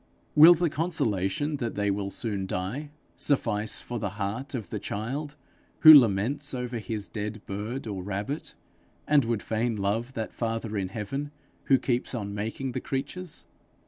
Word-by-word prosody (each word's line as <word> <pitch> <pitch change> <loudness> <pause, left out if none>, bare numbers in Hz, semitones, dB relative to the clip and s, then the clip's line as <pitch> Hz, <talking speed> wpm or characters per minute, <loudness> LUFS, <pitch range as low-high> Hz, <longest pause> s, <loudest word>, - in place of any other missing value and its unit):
Will 160 +4 +9
the 170 +1 +1
consolation 145 - -1
that 120 -4 -3
they 100 -1 +1
will 100 0 -2
soon 100 -2 -3
die, 105 +12 -3 0.3
suffice 110 -6 +1
for 120 -1 -5
the 100 -2 -4
heart 110 +8 -3
of 110 -6 -5
the - - -2
child 140 +8 -4 0.5
who 155 -1 +12
laments 130 +3 +4
over 125 -1 -3
his 105 -2 -4
dead 105 0 -4
bird 105 +7 -4
or 100 -4 -4
rabbit, 100 - -4 0.5
and 145 -2 +5
would 115 -2 -1
fain 115 +1 -1
love 110 +5 -1
that 110 -3 -4
father 115 -1 -3
in 95 -2 -1
heaven 130 +8 -4 0.4
who 135 - +5
keeps 125 0 -1
on 100 -3 -4
making 110 +6 -3
the - - -3
creatures? 150 +6 -5
115 Hz, 160 wpm, -27 LUFS, 105-140 Hz, 0.5 s, who